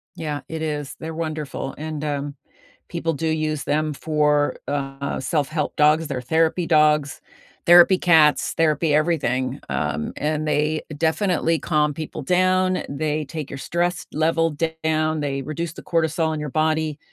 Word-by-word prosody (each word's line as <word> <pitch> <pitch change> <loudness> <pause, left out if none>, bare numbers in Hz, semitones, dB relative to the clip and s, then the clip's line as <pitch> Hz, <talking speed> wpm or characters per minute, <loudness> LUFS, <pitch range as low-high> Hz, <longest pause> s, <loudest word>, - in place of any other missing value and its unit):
Yeah. 150 -2 -4
It 160 0 -5
is. 150 -3 -3
They're 160 0 -6
wonderful, 155 -4 -4
and, 155 -1 -5
um, 145 -1 -3 0.5
people 165 -1 -2
do 160 +2 -2
use 155 -2 -1
them 155 +1 0
for, 150 -1 +1
uh, 140 -1 -3
self-help 150 +2 -1
dogs. 150 +2 +3
They're 130 -3 -3
therapy 160 +6 +1
dogs, 150 -2 +3 0.5
therapy 175 +2 +8
cats, 160 -4 +4
therapy 155 -1 +2
everything. 140 -5 0
Um, 75 - -2
and 155 +1 -1
they 150 +1 +1 0.2
definitely 165 0 +1
calm 150 -2 +1
people 155 -1 -6
down, 185 +3 +2
they 150 +2 -2
take 150 0 -6
your 140 - -5
stress 175 +3 -1
level 165 0 +1 0.3
down, 155 0 +1
they 140 -2 -2
reduce 155 +3 -4
the - - -11
cortisol 160 -1 0
in 155 - -3
your 150 -1 -4
body, 155 0 0
155 Hz, 145 wpm, -22 LUFS, 150-160 Hz, 0.5 s, therapy